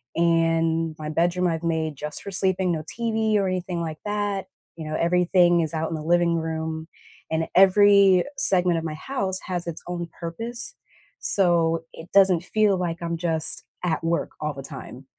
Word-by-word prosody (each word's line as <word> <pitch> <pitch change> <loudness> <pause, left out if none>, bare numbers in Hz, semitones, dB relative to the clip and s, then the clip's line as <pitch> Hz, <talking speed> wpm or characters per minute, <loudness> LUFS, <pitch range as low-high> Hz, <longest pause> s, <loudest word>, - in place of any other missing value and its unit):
and 165 -1 +1
my 155 0 -5
bedroom 175 +3 +1
I've 165 -1 -2
made 160 -2 -1
just 150 +2 -6
for 200 - -6
sleeping, 185 0 +1
no 160 -2 -1 0.2
TV 220 -2 0
or 195 -1 +1
anything 180 -1 -2
like 160 -2 -5
that, 205 -2 -2 0.3
you 160 -2 -7
know, - - -2
everything 175 0 +3
is 160 0 -2
out 160 0 -2
in 165 - -3
the 155 - -5
living 170 +1 +2
room, 160 -1 -3 0.4
and 160 0 0
every 195 -1 +6
segment 180 -8 +3
of - - -7
my 155 -2 -4
house 190 - -3
has 175 -2 -3
its 165 -1 -6
own 175 -1 -4
purpose, 230 +9 -5 0.5
so 170 -3 +2
it 165 +2 -11
doesn't 190 -4 +5
feel 210 +1 +2
like 175 -2 -2
I'm 170 0 -2
just 165 -2 -2 0.2
at 165 -2 -1
work 165 +1 -1
all 150 0 -2
the 135 - -7
time, 135 -1 -10
170 Hz, 180 wpm, -24 LUFS, 160-190 Hz, 0.5 s, every